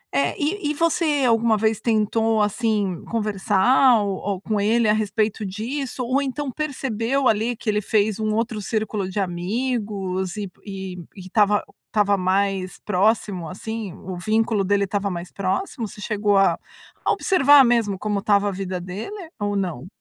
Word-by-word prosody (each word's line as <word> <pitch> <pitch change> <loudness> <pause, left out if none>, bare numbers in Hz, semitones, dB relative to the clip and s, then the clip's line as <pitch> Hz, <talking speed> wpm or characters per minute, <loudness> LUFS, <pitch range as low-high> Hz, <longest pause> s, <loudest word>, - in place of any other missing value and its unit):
É 140 0 +1
e 310 +2 -1
e 300 - 0
você 310 -3 +1
alguma 230 -2 +3
vez 220 0 0
tentou, 220 0 +1
assim, 210 -4 -1
conversar 220 +4 +3
ou 195 -2 -2
ou 195 -2 -3
com 210 -1 -1
ele 225 +2 +3
a 210 - +4
respeito 215 0 0
disso? 245 +7 -4
Ou 260 +3 +1
então 275 0 -3
percebeu 270 -3 -1
ali 225 +3 +1
que 225 - -13
ele 210 0 +2
fez 210 0 +1
um 215 -1 0
outro 225 -1 -1
círculo 215 -2 -2
de 190 - -3
amigos 195 0 -2
e 205 - -3 0.2
e 190 -2 -6 0.2
e - - -11
estava 205 +2 +2 0.2
estava 205 -2 +2
mais 190 0 0
próximo, 200 -3 0
assim, 210 +1 -5
o 185 -2 -7
vínculo 215 +1 +1
dele 200 +1 +2
estava 200 0 -2
mais 175 0 -6
próximo. 215 - -2
Você 210 - -12
chegou 205 -2 +1
a 195 - +4 0.5
a - - +2
observar 290 -6 +5
mesmo 230 -5 +2
como 210 -1 -1
estava 205 0 +2
a - - -2
vida 185 -1 -4
dele 220 - -7
ou 205 0 -1
não? 175 -6 -3
210 Hz, 165 wpm, -23 LUFS, 195-230 Hz, 0.5 s, observar